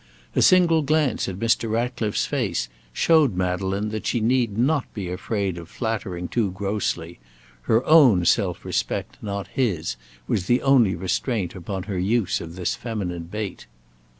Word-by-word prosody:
A -, -, +3 dB
single 170 Hz, -3 st, +5 dB
glance 150 Hz, -6 st, +1 dB
at 95 Hz, -, -6 dB
Mr. 115 Hz, +1 st, +1 dB
Ratcliffe's 115 Hz, -2 st, -1 dB
face 100 Hz, -, -1 dB, 0.2 s
showed 150 Hz, -, +3 dB
Madeleine 95 Hz, +3 st, -1 dB
that 110 Hz, 0 st, -4 dB
she 120 Hz, -, +1 dB
need 115 Hz, -2 st, +1 dB
not 140 Hz, +3 st, +1 dB
be 95 Hz, -4 st, -4 dB
afraid 95 Hz, -1 st, -2 dB
of 85 Hz, 0 st, -11 dB
flattering 100 Hz, -7 st, -3 dB
too 110 Hz, -1 st, 0 dB
grossly; 95 Hz, -, -3 dB, 0.5 s
her 115 Hz, +3 st, +3 dB
own 130 Hz, -, +6 dB
self 90 Hz, -1 st, +1 dB
respect, -, -, -2 dB
not 100 Hz, -1 st, -4 dB
his, 95 Hz, -, -1 dB, 0.3 s
was 90 Hz, -, -1 dB
the 120 Hz, +1 st, +2 dB
only 125 Hz, -9 st, +4 dB
restraint 95 Hz, +3 st, -1 dB
upon 95 Hz, +1 st, -5 dB
her 95 Hz, -2 st, -3 dB
use 105 Hz, +2 st, +1 dB
of 85 Hz, 0 st, -8 dB
this 90 Hz, -1 st, -1 dB
feminine 95 Hz, -8 st, -4 dB
bait. 100 Hz, -, -6 dB
105 Hz, 150 wpm, -24 LUFS, 90-120 Hz, 0.5 s, own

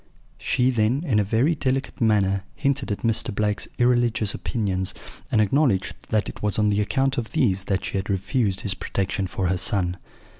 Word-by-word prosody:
"She 125 Hz, +1 st, +1 dB
then, 120 Hz, +5 st, +1 dB
in 115 Hz, -9 st, +2 dB
a -, -, +3 dB
very 115 Hz, +10 st, +2 dB
delicate 135 Hz, -2 st, -2 dB
manner, 100 Hz, -4 st, +2 dB
hinted 140 Hz, -4 st, -1 dB
at 100 Hz, -, -4 dB
Mr. 115 Hz, 0 st, +1 dB
Blake's 105 Hz, 0 st, -1 dB
irreligious 120 Hz, -4 st, +2 dB
opinions, 95 Hz, -4 st, -1 dB, 0.4 s
and 110 Hz, -, +3 dB
acknowledged 110 Hz, -2 st, +2 dB, 0.2 s
that 110 Hz, -1 st, +1 dB
it -, -, -8 dB
was 105 Hz, -1 st, 0 dB
on 105 Hz, -1 st, +3 dB
the 105 Hz, 0 st, +2 dB
account 135 Hz, +5 st, +1 dB
of 115 Hz, -, -6 dB
these 100 Hz, -11 st, +1 dB
that 95 Hz, -1 st, -1 dB
she -, -, -2 dB
had 95 Hz, +3 st, -3 dB
refused 100 Hz, +1 st, 0 dB
his 100 Hz, -, +1 dB
protection 95 Hz, 0 st, -2 dB
for 95 Hz, +1 st, -3 dB
her 90 Hz, +1 st, +1 dB
son. 90 Hz, -1 st, +1 dB
105 Hz, 185 wpm, -24 LUFS, 100-125 Hz, 0.4 s, a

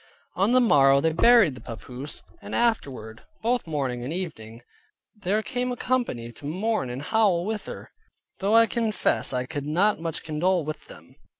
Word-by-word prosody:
On 195 Hz, +5 st, +2 dB
the 255 Hz, -, +5 dB
morrow 140 Hz, -, +5 dB
they 160 Hz, +3 st, +1 dB
buried 220 Hz, -, +5 dB
the 125 Hz, -, -11 dB
papoose, 125 Hz, +5 st, -7 dB, 0.2 s
and -, -, -6 dB
afterward, 135 Hz, -, -1 dB, 0.2 s
both 240 Hz, -3 st, 0 dB
morning 135 Hz, -6 st, -2 dB
and 130 Hz, -, -4 dB
evening, 120 Hz, -11 st, -6 dB, 0.5 s
there 210 Hz, +1 st, -1 dB
came 250 Hz, +1 st, -2 dB
a -, -, -2 dB
company 235 Hz, -, -2 dB
to 140 Hz, -, -13 dB
mourn 190 Hz, -, -1 dB
and 125 Hz, +3 st, -5 dB
howl 195 Hz, -2 st, +2 dB
with 215 Hz, -1 st, -4 dB
her; -, -, -9 dB, 0.5 s
though 205 Hz, +3 st, +2 dB
I 230 Hz, 0 st, +7 dB
confess 225 Hz, -2 st, 0 dB
I 125 Hz, -1 st, -1 dB
could 145 Hz, +1 st, -5 dB
not 190 Hz, +7 st, +2 dB
much 165 Hz, -1 st, -4 dB
condole 165 Hz, +2 st, 0 dB
with 155 Hz, 0 st, -6 dB
them. -, -, -15 dB
170 Hz, 175 wpm, -25 LUFS, 135-220 Hz, 0.5 s, I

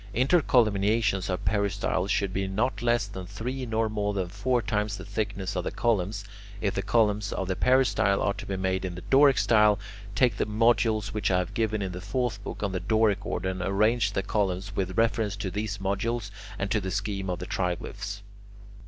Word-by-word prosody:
Intercolumniations 110 Hz, -, +2 dB
of 90 Hz, -, -3 dB
peristyles 100 Hz, -1 st, 0 dB
should 100 Hz, -2 st, 0 dB
be 95 Hz, 0 st, -1 dB
not 105 Hz, +3 st, -1 dB
less 120 Hz, -2 st, +2 dB
than 95 Hz, -2 st, -8 dB
three 125 Hz, +6 st, -4 dB
nor 110 Hz, 0 st, +1 dB
more 105 Hz, -1 st, -2 dB
than 95 Hz, -3 st, -1 dB
four 110 Hz, +7 st, 0 dB
times 105 Hz, -2 st, -1 dB
the 95 Hz, -, -8 dB
thickness 100 Hz, -2 st, -3 dB
of -, -, -1 dB
the -, -, -2 dB
columns. 100 Hz, -3 st, 0 dB, 0.4 s
If 100 Hz, -2 st, 0 dB
the 95 Hz, -, -1 dB
columns 105 Hz, -2 st, +1 dB
of 95 Hz, -, -2 dB
the 95 Hz, -, -1 dB
peristyle 115 Hz, -6 st, +3 dB
are 100 Hz, -, +1 dB
to -, -, -9 dB
be 95 Hz, -, -2 dB
made 95 Hz, 0 st, -1 dB
in 90 Hz, -2 st, -4 dB
the 90 Hz, -, -8 dB
Doric 140 Hz, 0 st, +6 dB
style, 105 Hz, -2 st, +4 dB, 0.4 s
take 115 Hz, -2 st, +3 dB
the -, -, 0 dB
modules 110 Hz, -1 st, +2 dB
which 105 Hz, -, 0 dB
I 90 Hz, -, +3 dB
have 90 Hz, -1 st, -2 dB
given 110 Hz, -2 st, 0 dB
in 95 Hz, -, -3 dB
the 90 Hz, 0 st, -6 dB
fourth 120 Hz, -3 st, -2 dB
book, -, -, -6 dB
on 100 Hz, -, 0 dB
the 95 Hz, -, -2 dB
Doric 110 Hz, -2 st, +2 dB
order, 95 Hz, -, -2 dB
and 95 Hz, -1 st, -4 dB
arrange 105 Hz, +3 st, +2 dB
the 95 Hz, -, -1 dB
columns 100 Hz, -1 st, -1 dB
with 95 Hz, +1 st, -2 dB
reference 110 Hz, -2 st, +1 dB
to 95 Hz, -1 st, -4 dB
these 105 Hz, 0 st, -3 dB
modules 100 Hz, +2 st, -2 dB, 0.3 s
and 100 Hz, 0 st, -3 dB
to 105 Hz, -1 st, +2 dB
the 95 Hz, -, -3 dB
scheme 100 Hz, 0 st, -2 dB
of 90 Hz, -, -1 dB
the -, -, -6 dB
triglyphs. 90 Hz, +2 st, -3 dB
100 Hz, 205 wpm, -27 LUFS, 95-110 Hz, 0.4 s, Doric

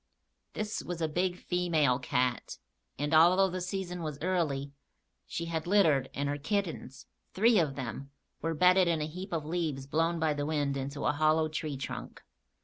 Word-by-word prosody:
This 215 Hz, 0 st, -3 dB
was 175 Hz, -2 st, -5 dB
a 160 Hz, -, +1 dB
big 180 Hz, +3 st, -1 dB
female 165 Hz, -9 st, +1 dB
cat, 125 Hz, -1 st, -1 dB, 0.4 s
and, 145 Hz, +2 st, -2 dB
although 180 Hz, +4 st, +6 dB
the 185 Hz, 0 st, -3 dB
season 180 Hz, -1 st, -4 dB
was 155 Hz, -3 st, -4 dB
early, 150 Hz, -5 st, -1 dB, 0.6 s
she 170 Hz, -, -4 dB
had 165 Hz, -1 st, -3 dB
littered 160 Hz, -9 st, +3 dB
and 140 Hz, 0 st, -1 dB
her 145 Hz, +1 st, -2 dB
kittens, 165 Hz, -4 st, -3 dB, 0.3 s
three 220 Hz, +2 st, +5 dB
of 150 Hz, -5 st, 0 dB
them, 135 Hz, +1 st, -5 dB, 0.3 s
were 165 Hz, +1 st, -1 dB
bedded 180 Hz, +3 st, +5 dB
in 165 Hz, -2 st, +1 dB
a 150 Hz, -, -1 dB
heap 180 Hz, +5 st, -7 dB
of 160 Hz, -3 st, -2 dB
leaves 155 Hz, -5 st, -2 dB
blown 165 Hz, +4 st, 0 dB
by 160 Hz, -1 st, +2 dB
the 145 Hz, 0 st, -3 dB
wind 145 Hz, -3 st, 0 dB
into 140 Hz, +1 st, -4 dB
a -, -, +4 dB
hollow 155 Hz, +1 st, +2 dB
tree 155 Hz, -2 st, -4 dB
trunk. 135 Hz, -, -7 dB
160 Hz, 175 wpm, -30 LUFS, 145-180 Hz, 0.6 s, although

